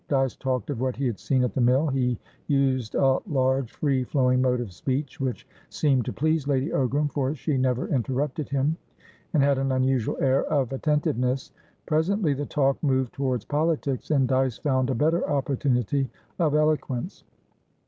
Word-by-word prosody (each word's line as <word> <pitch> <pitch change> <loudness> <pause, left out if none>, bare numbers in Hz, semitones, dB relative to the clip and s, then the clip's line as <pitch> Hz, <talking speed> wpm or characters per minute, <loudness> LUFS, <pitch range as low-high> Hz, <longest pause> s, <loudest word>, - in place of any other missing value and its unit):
Dyce 135 -2 +1
talked 130 0 -2
of 125 -4 -4
what 130 -1 -1
he 135 - -2
had 120 -5 -2
seen 130 -2 +1
at 125 - -1
the 130 - 0
mill; 130 +5 +4
he 130 -4 0 0.3
used 130 -5 +1
a 135 -1 +3
large, 130 - +1
free 135 -4 0
flowing 125 -1 +2
mode 125 -1 +2
of 115 -7 -5
speech, 135 - -3
which 130 -1 -3 0.2
seemed 135 -6 +1
to - - -3
please 155 -1 0
Lady 140 +1 +1
Ogram, 140 +3 +1
for 140 0 -1
she 150 0 -2
never 130 -1 0
interrupted 135 +3 -1
him 140 +3 0 0.5
and 150 -4 +3
had 140 -1 +3
an 135 0 0
unusual 130 -2 +1
air 135 0 +2
of 135 -4 0
attentiveness. 130 -3 0 0.3
Presently 160 +1 +1
the 145 +1 -4
talk 135 -2 +1
moved 130 -4 +1
towards 130 -4 -2
politics, 150 -3 -1
and 140 -4 +3
Dyce 130 -2 +1
found 130 -3 0
a 130 - 0
better 160 +8 +1
opportunity 135 -2 0 0.3
of 155 -4 +2
eloquence. 150 -1 0
135 Hz, 170 wpm, -25 LUFS, 130-145 Hz, 0.5 s, mill